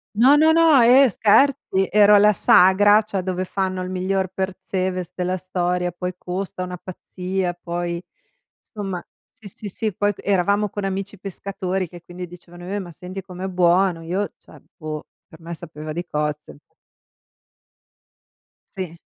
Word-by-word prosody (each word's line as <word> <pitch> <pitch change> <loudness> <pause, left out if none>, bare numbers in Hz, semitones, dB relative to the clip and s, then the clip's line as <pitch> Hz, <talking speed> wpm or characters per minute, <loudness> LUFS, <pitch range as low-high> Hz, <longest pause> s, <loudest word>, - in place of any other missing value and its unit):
No, 260 +6 +6
no, 315 +1 +5
no, 325 -6 +6
eh 255 +3 +7
scherzi, 215 -2 +3
ero 210 0 +6
alla 210 +1 +6
sagra, 205 +4 +5
cioè 200 -3 -3
dove 185 0 -2
fanno 185 -1 -2
il 185 - -5
miglior 185 0 -1
Percebes, 185 -1 -3
della 185 +1 -2
storia, 180 -1 -1
poi 180 +1 -5
costa 185 0 -4
una 180 0 -6
pazzia, 185 0 -4
poi 175 0 -4 0.6
insomma, 195 -5 -6 0.2
sì, 210 - -14
sì, 205 +2 -8
sì, 215 +1 -3
poi 205 0 +1
eravamo 200 +2 +1
con 205 +1 -5
amici 195 0 -4
pescatori 190 -1 -4
che 175 +1 -12
quindi 180 +1 -8
dicevano: 175 0 -13
"Eh, 205 - -1
ma 175 -3 -8
senti 185 +3 -8
com'è 185 0 -8
buono!" 180 -1 +2
Io 190 +5 -2
cioè, - - -17 0.2
boh, 155 -2 -6 0.2
per 160 - -16
me 170 +1 -7
sapeva 155 -2 -8
di 175 +2 -3
cozze. 150 - -3 2.2
Sì. 175 -3 -5
185 Hz, 150 wpm, -22 LUFS, 175-200 Hz, 2.2 s, eh